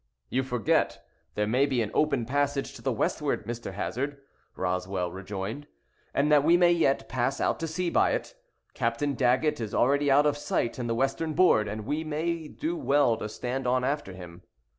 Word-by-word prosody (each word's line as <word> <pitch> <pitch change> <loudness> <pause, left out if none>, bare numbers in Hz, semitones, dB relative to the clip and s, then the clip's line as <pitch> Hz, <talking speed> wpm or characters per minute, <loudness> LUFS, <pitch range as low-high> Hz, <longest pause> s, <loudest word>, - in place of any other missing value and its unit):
"You 130 - +2
forget 120 -6 0 0.3
there 105 - +1
may 125 +6 +2
be 130 -3 0
an 105 - -5
open 140 -6 +1
passage 140 +2 -1
to - - -11
the - - 0
westward, - - -1
Mr. 115 -3 -5
Hazard," 140 +8 -3 0.4
Roswell 90 0 -2
rejoined, 100 +8 -6 0.4
"and 150 +2 +1
that 145 -2 +6
we 170 +3 +5
may 175 -1 +5
yet 135 -9 +2
pass 130 +1 -1
out - - 0
to 165 - -2
sea 170 +2 -2
by - - +3
it. - - -3 0.4
Captain 120 +5 -1
Daggett 130 +2 +1
is 110 -2 -4
already 140 +3 +3
out 140 +2 +5
of 145 -1 +2
sight 130 -4 -1
in 120 - -2
the 115 - 0
western 135 +5 -1
board, 110 -13 +4
and 105 +1 -5
we 150 +6 -1
may 160 +1 -2
do 320 - -3
well 145 - +3
to 105 - -5
stand 125 +4 -3
on 125 0 +2
after 140 -7 -2
him." 90 -2 -11
130 Hz, 190 wpm, -27 LUFS, 110-150 Hz, 0.4 s, that